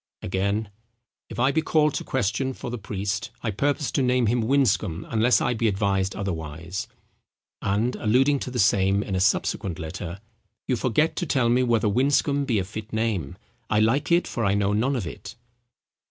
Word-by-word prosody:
Again; 100 Hz, +3 st, -1 dB, 0.6 s
"If -, -, -8 dB
I 130 Hz, +3 st, +3 dB
be 160 Hz, -, +1 dB
called 150 Hz, -2 st, +2 dB
to -, -, -3 dB
question 130 Hz, +2 st, -1 dB
for 125 Hz, -, -7 dB
the 120 Hz, -, -4 dB
priest, 100 Hz, +2 st, -3 dB
I 110 Hz, -, 0 dB
purpose 145 Hz, +6 st, 0 dB
to -, -, +1 dB
name 125 Hz, -1 st, +2 dB
him 120 Hz, +2 st, +1 dB
Winscombe, 110 Hz, -, +1 dB
unless 115 Hz, +2 st, +3 dB
I -, -, +1 dB
be 115 Hz, 0 st, 0 dB
advised 95 Hz, -2 st, 0 dB
otherwise." 80 Hz, -2 st, -4 dB, 0.7 s
And, 105 Hz, +6 st, 0 dB
alluding 135 Hz, +6 st, +3 dB
to -, -, -5 dB
the 125 Hz, -, -5 dB
same 100 Hz, -1 st, +3 dB
in 100 Hz, -, -5 dB
a 95 Hz, -, +1 dB
subsequent 95 Hz, -2 st, 0 dB
letter—"You 95 Hz, -, -6 dB
forget 130 Hz, +7 st, +1 dB
to 175 Hz, -, -2 dB
tell 130 Hz, -4 st, +2 dB
me 125 Hz, +2 st, +3 dB
whether 115 Hz, -3 st, +2 dB
Winscombe 140 Hz, +5 st, +2 dB
be 120 Hz, -5 st, +1 dB
a 95 Hz, -, +1 dB
fit 105 Hz, +3 st, -8 dB
name. 110 Hz, -10 st, -2 dB, 0.3 s
I 105 Hz, -, +2 dB
like 120 Hz, +9 st, +2 dB
it, 170 Hz, +1 st, +4 dB
for 115 Hz, -, -3 dB
I 100 Hz, -1 st, +2 dB
know 100 Hz, 0 st, +1 dB
none 125 Hz, +7 st, +1 dB
of 115 Hz, -7 st, -2 dB
it." 80 Hz, -, -8 dB
110 Hz, 185 wpm, -25 LUFS, 100-130 Hz, 0.7 s, it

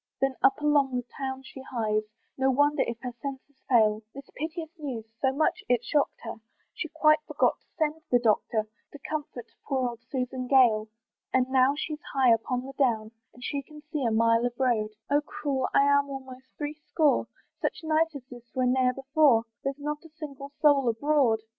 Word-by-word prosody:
Then 270 Hz, 0 st, +1 dB
up 270 Hz, -, +4 dB
along 290 Hz, -3 st, +3 dB
the 245 Hz, -1 st, -2 dB
town 265 Hz, -1 st, -4 dB
she 265 Hz, 0 st, -10 dB
hies, 220 Hz, -5 st, -1 dB, 0.3 s
No 265 Hz, 0 st, +2 dB
wonder 290 Hz, +2 st, +3 dB
if 235 Hz, -, -3 dB
her 250 Hz, -2 st, -5 dB
senses 275 Hz, 0 st, -7 dB
fail, 215 Hz, -4 st, +4 dB
This 275 Hz, 0 st, -10 dB
piteous 320 Hz, +1 st, -5 dB
news 255 Hz, -7 st, -5 dB, 0.2 s
so 265 Hz, -, +3 dB
much 295 Hz, +3 st, 0 dB
it 245 Hz, -1 st, +3 dB
shock'd 290 Hz, +2 st, +1 dB
her, 230 Hz, -, -6 dB, 0.4 s
She 330 Hz, -, -4 dB
quite 310 Hz, 0 st, +4 dB
forgot -, -, +1 dB
to -, -, -38 dB
send 315 Hz, -1 st, 0 dB
the 245 Hz, -, +5 dB
Doctor, 220 Hz, -1 st, +1 dB, 0.3 s
To 290 Hz, -, -10 dB
comfort 290 Hz, -6 st, -5 dB
poor 260 Hz, -2 st, 0 dB
old 235 Hz, -1 st, -9 dB
Susan 255 Hz, -1 st, -3 dB
Gale. 235 Hz, -5 st, +5 dB, 0.4 s
And 255 Hz, -1 st, +2 dB
now 260 Hz, +1 st, +4 dB
she's 305 Hz, 0 st, -4 dB
high 260 Hz, -3 st, +6 dB
upon 245 Hz, +3 st, -1 dB
the 270 Hz, -, -8 dB
down, 220 Hz, -5 st, +1 dB, 0.2 s
And 245 Hz, -, -12 dB
she 280 Hz, +2 st, -2 dB
can 300 Hz, +2 st, -14 dB
see 300 Hz, -4 st, -1 dB
a 235 Hz, -, +2 dB
mile 230 Hz, +1 st, +3 dB
of 245 Hz, +1 st, -2 dB
road, 235 Hz, -5 st, +2 dB, 0.2 s
"Oh 290 Hz, +1 st, +4 dB
cruel! 290 Hz, -3 st, -2 dB
I'm 280 Hz, 0 st, +4 dB
almost 260 Hz, -1 st, -8 dB
three 295 Hz, 0 st, -3 dB
score; 305 Hz, -4 st, +2 dB, 0.3 s
"Such 360 Hz, -, -2 dB
night 320 Hz, 0 st, +1 dB
as 265 Hz, -3 st, -8 dB
this 240 Hz, -2 st, -13 dB
was 255 Hz, -1 st, +2 dB
ne'er 255 Hz, 0 st, +2 dB
before, 270 Hz, -3 st, +4 dB, 0.2 s
"There's 275 Hz, 0 st, -2 dB
not 295 Hz, +1 st, -4 dB
a 325 Hz, -, -13 dB
single 295 Hz, -3 st, -8 dB
soul 280 Hz, -4 st, +5 dB
abroad." 245 Hz, -2 st, +2 dB
265 Hz, 190 wpm, -28 LUFS, 245-290 Hz, 0.4 s, high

